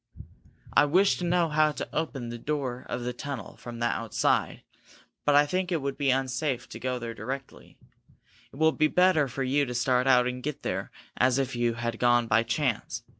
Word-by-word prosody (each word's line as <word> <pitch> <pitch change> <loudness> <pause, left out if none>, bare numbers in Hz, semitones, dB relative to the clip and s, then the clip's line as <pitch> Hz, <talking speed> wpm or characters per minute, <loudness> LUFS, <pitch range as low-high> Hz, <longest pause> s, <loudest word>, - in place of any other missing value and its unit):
"I - - +6
wish 185 +7 +3
to 180 - -2
know 175 -1 +2
how 155 0 +3
to - - -5
open 140 -6 -3
the 120 0 -6
door 130 -3 -3
of 125 - -3
the 125 0 -3
tunnel 125 -5 -6
from 120 -1 -8
the 120 - -1
outside," 115 -2 0 0.2
said - - -22
Fred. - - -25 0.2
"But 145 - +4
I 145 +1 +6
think 185 +4 -2
it 170 - +1
would 140 -1 -3
be 140 0 0
unsafe 130 0 -1
to - - -8
go 130 0 -2
there 120 -1 -5
directly. 130 +4 -7 0.7
It - - -15
will 160 +2 +3
be 155 0 +2
better 180 -4 +3
for 135 +2 -4
you 140 +3 +2
to 125 -3 -4
start 125 +1 +2
out 125 -2 +5
and 125 0 -3
get 150 +2 -5
there - - -3 0.3
as 130 0 +3
if 135 -2 -1
you 120 -1 0
had 120 -1 -3
gone 120 -1 +4
by 115 0 +3
chance. 120 0 -2
130 Hz, 215 wpm, -27 LUFS, 120-150 Hz, 0.7 s, I